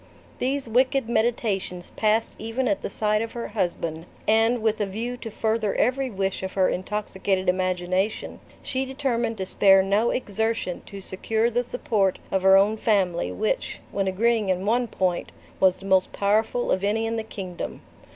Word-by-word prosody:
These 265 +1 -1
wicked 255 +2 +2
meditations 220 -6 -1
passed 220 +1 +2
even 225 +4 -2
at 200 -3 0
the - - -4
side 210 +1 0
of 225 0 -4
her 235 - -5
husband, 170 -5 -2 0.2
and, 225 +2 +3
with 220 -1 +1
a 205 - 0
view 230 +5 -4
to 230 - -7
further 220 -1 -1
every 260 +1 +1
wish 195 -3 -2
of 190 0 -5
her 190 -1 +3
intoxicated 190 -1 -2
imagination, 185 +2 -1 0.2
she 260 0 -1
determined 255 -4 -1
to 190 - -3
spare 195 0 +5
no 205 +4 +2
exertion 220 -5 -1
to 200 -1 -8
secure 220 +5 0
the 245 +2 +1
support 210 -6 0
of 190 - +1
her 190 +1 +7
own 205 +3 +3
family, 185 - +1
which, 90 - -2
when 195 -1 -1
agreeing 215 +2 +1
in 185 +1 0
one 240 +3 +2
point, 185 -4 -1 0.3
was 185 -1 +4
the - - -10
most 190 -1 +3
powerful 215 +4 +1
of 190 - +1
any 215 +3 +1
in 225 0 -1
the 225 - -2
kingdom. 190 -5 -6
210 Hz, 170 wpm, -25 LUFS, 190-230 Hz, 0.3 s, her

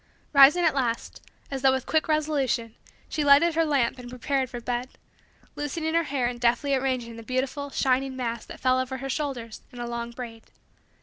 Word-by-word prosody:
Rising 285 +5 +7
at 320 - +4
last, 245 -4 -2 0.3
as 270 -1 -3
though 265 0 +5
with 265 0 -2
quick 315 -1 +1
resolution, 285 -7 0 0.3
she 305 - -2
lighted 290 +4 +6
her 330 +1 +2
lamp 270 -6 +1
and 245 -1 -9
prepared 260 +1 -1
for 240 -1 -6
bed; 245 +1 -3 0.7
loosening 315 +2 -3
her 335 0 +2
hair 270 -4 -1
and 240 0 -2
deftly 245 +4 +2
arranging 255 -3 -1
the - - -8
beautiful, 260 +4 -2
shining, 265 0 0
mass 235 -3 -3
that - - -10
fell 255 0 +3
over 260 0 -3
her 270 +1 -5
shoulders 250 -6 -4
in 245 - -13
a 240 - -3
long 235 0 -4
braid. 235 -2 -9
260 Hz, 190 wpm, -26 LUFS, 240-285 Hz, 0.7 s, Rising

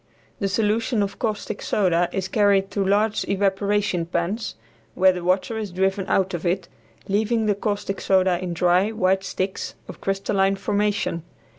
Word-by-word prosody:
The 200 - 0
solution 220 +2 +1
of 200 0 -5
caustic 215 -3 -3
soda 175 -3 +1
is 190 -1 -2
carried 200 -1 +2
to 200 - 0
large 205 +3 +2
evaporating 200 -2 +1
pans, 175 +6 -2 0.4
where 185 0 +5
the 180 -1 -5
water 190 +5 0
is 210 -2 -4
driven 190 +2 0
out 190 -1 +1
of 170 - -3
it, 185 +1 0 0.4
leaving 220 +3 +1
the 210 - +3
caustic 200 -1 -3
soda 185 -2 +3
in 180 -1 -3
dry, 180 +4 +3
white 190 -2 +1
sticks 190 0 -3
of - - -10
crystalline 195 0 +1
formation. 205 -3 -1
195 Hz, 155 wpm, -23 LUFS, 185-205 Hz, 0.4 s, where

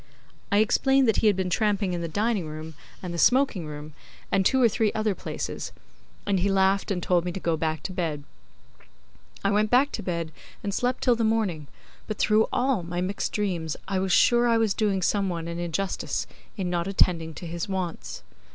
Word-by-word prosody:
I 200 - +4
explained 265 +5 +3
that 225 - +3
he 220 - +3
had 205 - +4
been 185 -1 -2
tramping 205 -1 +1
in 175 - -2
the 170 - -2
dining 205 0 0
room 155 +1 -7 0.3
and 180 -1 -4
the 170 - -3
smoking 250 - +3
room 150 0 -8 0.4
and 195 - +3
two 265 +7 +3
or 245 - +6
three 220 -1 +1
other 215 -1 0
places, - - -5 0.5
and 195 -2 +1
he 195 +3 +1
laughed 195 0 +2
and 180 -4 -1
told 175 -2 +2
me 180 - -2
to 190 - -4
go 170 -2 0
back 160 0 -2
to 190 - -4
bed. 160 -5 -2 1.2
I 200 - +3
went 210 +1 +2
back 260 +5 +4
to - - -4
bed 170 -3 -3 0.3
and 200 -1 -2
slept 250 +4 -1
till 245 -2 +4
the 230 - -1
morning, 210 -9 0 0.4
but 215 - -4
through 215 +1 +3
all 250 -4 +1
my 175 +1 -4
mixed 185 +3 -2
dreams 175 -7 -2
I 190 -1 0
was 190 0 -1
sure 240 +6 +5
I 230 -1 +4
was 220 -3 +2
doing 195 -3 0
some 200 +1 +1
one 170 -2 -4
an 170 0 -4
injustice 175 +3 -2 0.3
in 190 -3 -2
not 175 0 -1
attending 165 -5 +1
to 175 - -8
his 170 +2 -4
wants. 175 - -4
190 Hz, 205 wpm, -26 LUFS, 170-215 Hz, 1.2 s, or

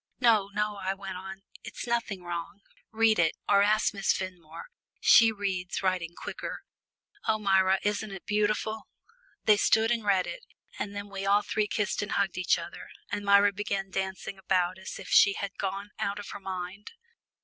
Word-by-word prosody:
"No, 225 -5 +4
no," 210 0 -1
I 190 0 -2
went 195 -2 -7
on, 190 +1 -9 0.2
"it's - - -7
nothing 230 -6 -2
wrong. 175 +4 -5 0.3
Read 225 -2 +3
it, 160 -2 +3
or 200 -1 +5
ask 215 +2 +3
Miss 195 -1 +1
Fenmore 180 - -7 0.3
she 225 -1 +7
reads 195 -4 -3
writing 180 -3 -1
quicker. - - -6 0.6
Oh, 215 - +3
Myra, 190 -2 +3
isn't 210 +1 -1
it 195 -2 -9
beautiful?" 215 +1 0 0.6
They 210 -1 +6
soon 225 +2 +3
read 195 -3 +2
it, - - -7 0.4
and 205 0 -4
then 200 0 -5
we 195 -1 -5
all 205 +1 +4
three 210 0 0
kissed 210 -1 -1
and 205 - -3
hugged 195 -2 0
each 180 - +3
other, - - -8 0.2
and 205 0 -2
Myra 200 0 +5
began 195 -1 -3
dancing 190 0 -4
about 185 -1 0
as 190 - -7
if 195 - -9
she 200 - +6
had 200 0 -4
gone 200 +1 -3
out 200 0 -1
of 205 - -7
her - - -7
mind. 190 - -6
200 Hz, 175 wpm, -28 LUFS, 190-210 Hz, 0.6 s, she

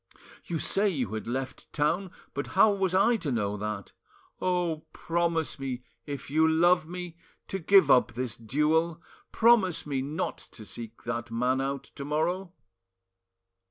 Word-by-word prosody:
You 170 - -2
say 200 +6 +2
you 125 - -2
had 110 - -4
left 130 +2 -4
town 170 +6 0 0.2
but 140 - -3
how 210 +2 +7
was 190 -2 0
I 230 +5 +4
to 150 -9 -3
know 105 -4 0
that? 105 -1 -4 0.5
Oh! 175 -4 0
promise 170 -3 -1
me, 130 -2 -4 0.2
if 140 -1 -6
you 160 +2 +4
love 165 0 +4
me, 175 -1 -7 0.3
to 195 - -2
give 185 -4 +5
up 125 -2 +5
this 125 -1 -3
duel! 155 +7 +1 0.3
Promise 200 -8 +4
me 140 -3 -1
not 150 +7 -3
to 110 - -11
seek 115 +1 -9
that 120 0 -3
man 125 +3 +1
out 135 0 -2
to 140 - -7
morrow!" 170 +6 -1
155 Hz, 155 wpm, -28 LUFS, 130-175 Hz, 0.5 s, how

